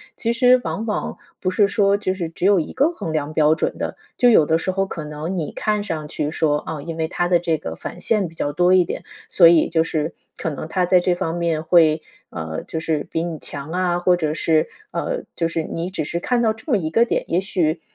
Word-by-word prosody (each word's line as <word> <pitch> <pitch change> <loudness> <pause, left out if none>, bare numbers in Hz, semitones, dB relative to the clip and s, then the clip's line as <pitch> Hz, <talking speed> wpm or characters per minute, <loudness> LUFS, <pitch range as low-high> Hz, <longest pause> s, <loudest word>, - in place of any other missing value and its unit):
其 230 -1 -1
实 250 +1 +5
往 225 - -3
往 210 - -3 0.2
不 185 - 0
是 200 +2 +3
说 200 0 +2
就 185 -2 -1
是 175 -4 -4
只 165 - -4
有 200 -1 +5
一 - - -6
个 315 +5 +2
衡 165 - -5
量 155 -1 -2
标 155 0 +4
准 160 - -2
的。 - - -4 0.2
就 245 -1 +5
有 165 -9 +6
的 160 +1 +2
时 175 +3 -2
候 195 +1 0
可 165 -4 -6
能 150 +5 -5
你 155 - -3
看 210 -1 -1
上 155 -6 -4
去 150 0 -3
说， 150 -2 +1
啊， 150 -1 -6
因 165 +1 -5
为 160 -1 -1
他 175 - 0
的 175 -1 +3
这 165 -2 0
个 80 - -6
返 175 - -8
现 205 0 +1
比 165 - -15
较 145 - -2
多 180 +3 +3
一 180 -2 +5
点， - - -5 0.3
所 170 - +7
以 170 -2 +4
就 160 -1 +2
是 160 -1 -2 0.2
可 160 - -2
能 150 +2 -6
他 180 +1 +1
在 180 0 +5
这 175 0 +1
方 165 -1 -2
面 165 -2 -1
会， 160 -2 +4 0.3
呃， 80 -1 -5
就 160 - -4
是 155 -2 -1
比 165 - -1
你 165 -3 -4
强 145 +2 -6
啊， 180 -1 +1
或 180 0 +3
者 155 -3 -1
是， 160 0 +2 0.2
呃， - - -3
就 165 - 0
是 165 -1 -2
你 165 +3 -4
只 185 -4 -3
是 170 - -2
看 245 +6 0
到 220 -2 +2
这 225 +7 -8
么 225 - +4
一 160 -5 -2
个 230 +8 +4
点。 - - -1
也 175 - +1
许 170 -5 -1
170 Hz, 270 characters per minute, -21 LUFS, 155-190 Hz, 0.3 s, 所